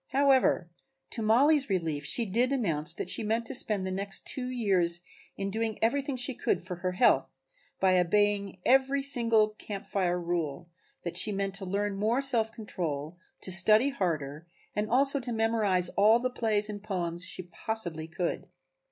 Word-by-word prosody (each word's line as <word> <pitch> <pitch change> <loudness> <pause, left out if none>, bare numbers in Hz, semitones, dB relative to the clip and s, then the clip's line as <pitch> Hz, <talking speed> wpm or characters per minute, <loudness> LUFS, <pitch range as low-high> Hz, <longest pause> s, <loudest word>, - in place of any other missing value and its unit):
However, 265 -9 +2 0.4
to 230 - -2
Mollie's 275 +6 +3
relief, 160 -6 -2
she 235 - +1
did 235 +6 0
announce 165 - +1
that 175 - -4
she - - -1
meant 225 +2 -1
to 270 - -3
spend 210 -6 +3
the 190 - -3
next 195 +1 -1
two 250 -2 +1
years 190 -9 0 0.4
in 195 0 -3
doing 220 0 -2
everything 275 +4 0
she 250 +2 +1
could 190 - -1
for 180 0 -7
her 180 +1 -3
health 235 +7 +1 0.4
by 185 -1 +3
obeying 200 +2 0
every 270 +2 +3
single 230 -5 +2
Camp 200 -2 -7
Fire 180 -3 -1
rule, 170 -2 -4 0.3
that 175 0 -5
she 210 +4 +3
meant 195 -1 -3
to 195 -1 -2
learn 200 +2 -2
more 220 +5 0
self 240 -5 +1
control, 165 -8 -5 0.3
to 185 - -3
study 215 +8 +6
harder 160 - -4 0.3
and 210 +1 -2
also 275 +4 +6
to 245 -2 -5
memorize 220 -5 +1
all 215 +3 +4
the 255 +1 -3
plays 215 -3 0
and 205 -1 -7
poems 175 -5 -4
that 185 - 0
she 185 - -3
possibly 170 -3 -6
could. 170 +1 -4
205 Hz, 175 wpm, -28 LUFS, 180-235 Hz, 0.4 s, study